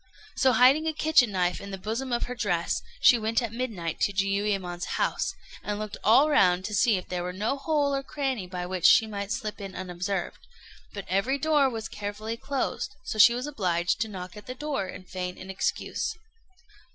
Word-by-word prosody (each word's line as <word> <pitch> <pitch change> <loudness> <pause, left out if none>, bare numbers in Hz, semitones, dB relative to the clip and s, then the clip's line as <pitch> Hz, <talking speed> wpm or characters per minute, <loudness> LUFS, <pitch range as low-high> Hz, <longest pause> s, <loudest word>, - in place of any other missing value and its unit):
So 260 -2 +3
hiding 265 +7 +5
a 320 - 0
kitchen 300 -7 +4
knife 180 -1 0
in 200 - -8
the 195 - -5
bosom 225 +7 -4
of 240 - 0
her 250 - -3
dress, 180 -8 -1 0.2
she 240 - +7
went 220 +1 +1
at 230 -2 -3
midnight 215 -10 -3
to - - +2
Jiuyémon's 195 -2 -1
house, - - 0 0.3
and 210 0 -3
looked 215 -1 -5
all 245 +8 +6
round 185 -11 +3
to 210 - -4
see 210 +1 +3
if 180 - -7
there 180 -1 -3
were 180 +1 -3
no 210 +8 -1
hole 285 0 0
or 275 - 0
cranny 270 -8 -3
by 180 -1 -5
which 180 -1 +2
she 225 - +6
might 200 -2 -5
slip 215 -1 -4
in 195 -1 -7
unobserved; 185 +1 -3 0.5
but 200 -2 -7
every 200 +9 +1
door 290 -1 +3
was 225 -3 -5
carefully 210 +2 -5
closed, 270 +3 -3
so 220 - -5
she 235 +3 +8
was 250 +2 -3
obliged 180 -9 0
to 225 - +1
knock 185 -2 -8
at 210 - -11
the 255 - -5
door 275 -8 -3
and 185 0 -10
feign 180 -1 -5
an 190 - -8
excuse. 190 - -2
210 Hz, 200 wpm, -27 LUFS, 185-255 Hz, 0.5 s, she